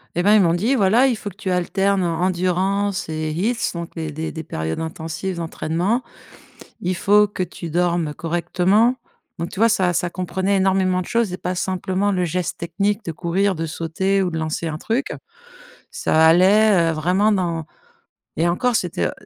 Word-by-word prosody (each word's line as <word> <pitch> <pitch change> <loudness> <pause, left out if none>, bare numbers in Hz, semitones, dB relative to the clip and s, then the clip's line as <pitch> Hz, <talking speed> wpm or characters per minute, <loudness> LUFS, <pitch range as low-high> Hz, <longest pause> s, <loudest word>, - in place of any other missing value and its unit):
Et 175 - +1
ben, 205 +4 +5
ils 215 - +6
m'ont 170 -3 +3
dit: 220 +10 +1
«Voilà, 230 +4 +4
il 250 - +1
faut 205 - -6
que - - -19
tu 195 -2 -5
alternes 190 +2 +1
endurance 185 +3 0
et 155 0 -3
health 225 +7 0
donc 170 -1 -6
des 160 -2 -4
des 160 +2 -4
des 160 -1 -6
périodes 80 - -4
intensives 160 +3 -4
d'entraînement. 170 +7 -1 0.8
Il 180 +1 -1
faut 210 +3 +4
que 195 -2 -3
tu 170 -1 -7
dormes 170 -2 0
correctement» 180 +7 +1 0.4
donc 170 0 -4
tu - - -7
vois? 230 +1 +5
Ça 185 -5 +2
ça 175 - 0
comprenait 190 +2 -1
énormément 190 -1 +2
de - - -7
choses 230 -3 0
et 180 - -4
pas 180 - -3
simplement 185 +2 -1
le 180 -2 0
geste 175 +1 -2
technique 200 +5 -2
de 165 - -3
courir, 185 +5 0
de 165 0 -3
sauter 180 +5 -1
ou 180 - -1
de 160 - -3
lancer 160 +1 -2
un 155 -1 -4
truc. 235 +9 -2 0.8
Ça 160 0 +2
allait, 185 +1 +5
heu, - - -1
vraiment 180 +7 +2
dans 170 -5 -1 0.7
et 170 +2 +2
encore 235 +8 +1
c'était, 170 - 0
heu, - - -6
180 Hz, 185 wpm, -21 LUFS, 165-200 Hz, 0.8 s, ils